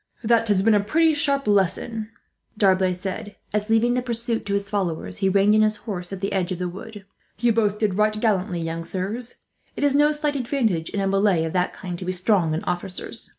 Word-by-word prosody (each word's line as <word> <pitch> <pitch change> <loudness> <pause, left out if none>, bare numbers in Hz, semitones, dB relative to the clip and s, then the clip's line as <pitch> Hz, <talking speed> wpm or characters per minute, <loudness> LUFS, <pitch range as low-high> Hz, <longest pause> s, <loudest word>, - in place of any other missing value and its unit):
"That 230 0 +3
has 200 -2 +3
been 225 +1 +4
a 205 - +5
pretty 315 +11 +3
sharp 280 -2 0
lesson," 210 +3 0 0.5
D'Arblay 190 -2 +3
said 190 +3 -5 0.2
as, 210 +1 -1
leaving 225 +2 +3
the 250 - +1
pursuit 235 -2 -2
to 200 - 0
his 200 0 -2
followers, 190 -6 -2
he 195 -1 +1
reined 200 +2 +4
in 215 - +5
his 215 0 +3
horse 190 -5 -6
at 195 -1 -6
the 195 - -2
edge 190 -1 -1
of 180 - -2
the 180 0 -2
wood. 200 +3 -9 0.3
"You 235 +1 +2
both 210 -2 +1
did 210 -3 0
right 215 +2 +1
gallantly, 190 -6 0
young 165 0 -3
sirs. 200 +8 -4 0.3
It - - -3
is 285 -1 +4
no 295 +1 +4
slight 295 -1 -1
advantage, 230 - 0
in 200 - -2
a 195 - 0
melee 195 -3 +2
of 160 - -3
that 180 -1 0
kind, 180 -3 -6
to 185 - -6
be 185 - -1
strong 180 -3 +2
in 160 - -3
officers. 180 +1 -4
205 Hz, 225 wpm, -23 LUFS, 185-225 Hz, 0.5 s, a